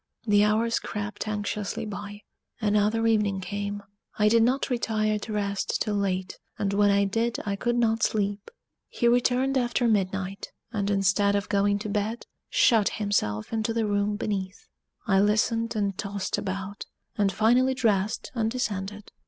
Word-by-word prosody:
The 205 -2 +4
hours 220 +2 +2
crept 210 0 -5
anxiously 210 -1 -3
by: 205 0 -7 0.4
another 210 +1 +2
evening 210 -3 +2
came. 205 +1 -4 0.3
I 210 0 +4
did 230 +1 +4
not 255 +4 +1
retire 215 -3 0
to 215 - -7
rest 200 -1 -1
till 210 - -1
late, 190 -2 -2 0.2
and 200 -1 -1
when 205 0 +4
I 200 0 +3
did 225 +4 0
I 200 -1 -1
could 240 +4 -1
not 225 -1 +2
sleep. 205 -1 -1 0.4
He 240 - 0
returned 250 +2 +2
after 240 0 +1
midnight, 195 -2 -1 0.3
and 200 -2 -1
instead 200 +1 +2
of 200 0 -2
going 200 0 +2
to 210 +1 -5
bed, 210 +3 -2 0.2
shut 220 -4 +4
himself 200 - -1
into 225 0 -1
the 225 -1 +1
room 205 0 0
beneath. 200 -2 -4 0.4
I 195 -5 +3
listened 225 +3 +1
and 200 -2 0
tossed 200 0 -3
about, 195 0 -5 0.3
and 200 -2 +2
finally 245 +6 +3
dressed 220 0 0
and 225 -3 0
descended. 210 -4 -4
210 Hz, 155 wpm, -26 LUFS, 200-225 Hz, 0.4 s, The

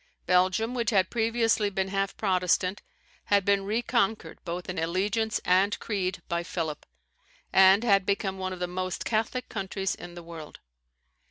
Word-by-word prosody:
Belgium, 185 +6 +2
which 235 -3 0
had 190 -4 +2
previously 225 -2 +1
been 190 -1 -2
half 195 0 -2
Protestant, 185 -1 +1 0.4
had 200 -2 +2
been 200 -1 +3
reconquered 225 0 0
both 175 0 -5
in 180 -2 -3
allegiance 205 +7 0
and 190 +3 +3
creed 190 -3 -3
by 170 -1 -1
Philip, 165 -3 -4 0.7
and 190 +3 +7
had 200 -4 +4
become 195 0 -1
one 185 0 -3
of 185 - -6
the 180 - 0
most 185 0 -4
Catholic 225 +3 -1
countries 195 -1 -3
in 175 0 -10
the 175 - -9
world. 165 -2 -10
195 Hz, 155 wpm, -27 LUFS, 180-215 Hz, 0.7 s, and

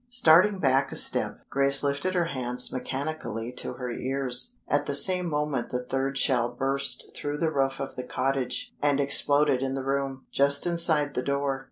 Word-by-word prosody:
Starting 195 -3 +5
back 135 -4 +2
a - - -6
step, - - 0
Grace 140 +1 +1
lifted 145 +7 -1
her 175 -1 +2
hands 125 -4 -3
mechanically 130 -3 -4
to - - -5
her 125 -1 -5
ears. 135 - +1
At 145 0 0
the 140 - 0
same 180 +5 +6
moment 150 -4 -2
the 125 0 -4
third 135 +1 -2
shell 120 -4 +2
burst 135 +1 -2
through 145 0 -4
the 160 0 0
roof 135 -2 0
of 135 - -5
the 125 - -5
cottage, 135 - -2
and 145 -1 +2
exploded 140 -1 +2
in 135 0 -2
the 135 -1 -4
room, 135 -1 -2
just 140 0 +2
inside 165 -4 +1
the - - -1
door. 140 0 -1
140 Hz, 180 wpm, -26 LUFS, 130-150 Hz, -, same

